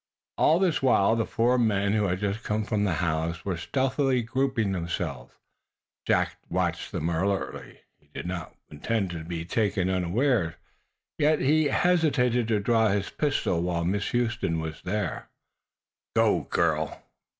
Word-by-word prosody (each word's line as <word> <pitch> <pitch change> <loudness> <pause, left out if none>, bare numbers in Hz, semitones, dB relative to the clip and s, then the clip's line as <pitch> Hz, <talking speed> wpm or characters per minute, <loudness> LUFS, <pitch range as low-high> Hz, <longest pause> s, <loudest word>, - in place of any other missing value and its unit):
All 160 - +5
this 175 -6 +1
while 115 -5 +4
the 115 -1 -1
four 120 +2 +2
men 100 -3 +2
who 105 -1 +2
had 90 -1 -1
just 105 +2 -1
come 105 +1 -1
from 105 -2 0
the 95 -4 0
house 80 +1 -2
were 95 -3 -1
stealthily 130 - 0
grouping 120 -3 0
themselves. 85 -8 -4 0.7
Jack - - +1
watched - - -1
them 80 - -2
alertly. 95 +4 -2 0.2
He - - -31
did - - -7
not 90 0 -5 0.2
intend 95 +6 -2
to 85 -2 -5
be 85 0 -5
taken 95 -2 0
unawares, 95 - +1 0.6
yet 150 +1 +3
he 155 +3 +3
hesitated 140 -8 +2
to 110 -2 +1
draw 110 +1 +3
his 100 -1 -1
pistol 145 - 0
while 85 -1 -1
Miss 100 +3 -1
Huston 120 -8 0
was 80 0 -5
there. 105 +1 -3 0.9
"Go, - - +2
girl!" 80 -2 0
105 Hz, 150 wpm, -27 LUFS, 85-125 Hz, 0.9 s, All